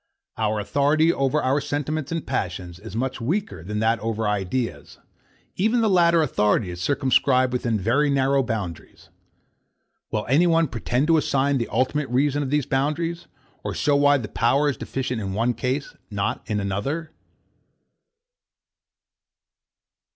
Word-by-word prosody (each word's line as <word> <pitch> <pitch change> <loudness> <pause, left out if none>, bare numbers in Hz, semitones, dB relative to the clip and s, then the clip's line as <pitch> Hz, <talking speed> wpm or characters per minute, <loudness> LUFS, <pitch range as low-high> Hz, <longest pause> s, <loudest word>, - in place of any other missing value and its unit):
Our 110 -1 0
authority 145 +9 +2
over 135 +2 0
our 135 +3 +2
sentiments 145 +1 -3
and 165 -3 -3
passions 90 -1 -4
is 95 - -9
much 130 +1 -2
weaker 120 - -2
than 105 +4 -4
that 115 +1 +2
over 110 0 -2
our 105 - +2
ideas; 105 +5 -3
and - - -32 0.5
even 225 +5 +2
the 220 - +3
latter 170 -2 +4
authority 105 -7 +1
is 85 0 -7
circumscribed 130 +2 +2
within 120 -3 0
very 125 +9 +2
narrow 135 0 +2
boundaries. 105 - -5 1.0
Will 105 -1 -2
any 155 +7 +4
one 165 -3 +3
pretend 125 +3 -1
to 165 0 +4
assign 140 -2 +1
the 115 - -2
ultimate 140 +2 0
reason 140 +3 +1
of 140 - -2
these 145 -1 +1
boundaries, 155 +5 -1 0.4
or - - -4
show 145 - +2
why 145 0 +5
the 115 -5 -5
power 135 +7 +2
is 140 - -1
deficient 125 -1 -3
in 95 -2 -4
one 115 +4 +1
case, 130 +4 -3 0.2
not 100 -2 -2
in 105 -3 -1
another. 135 +12 -3
130 Hz, 150 wpm, -23 LUFS, 110-150 Hz, 1.0 s, why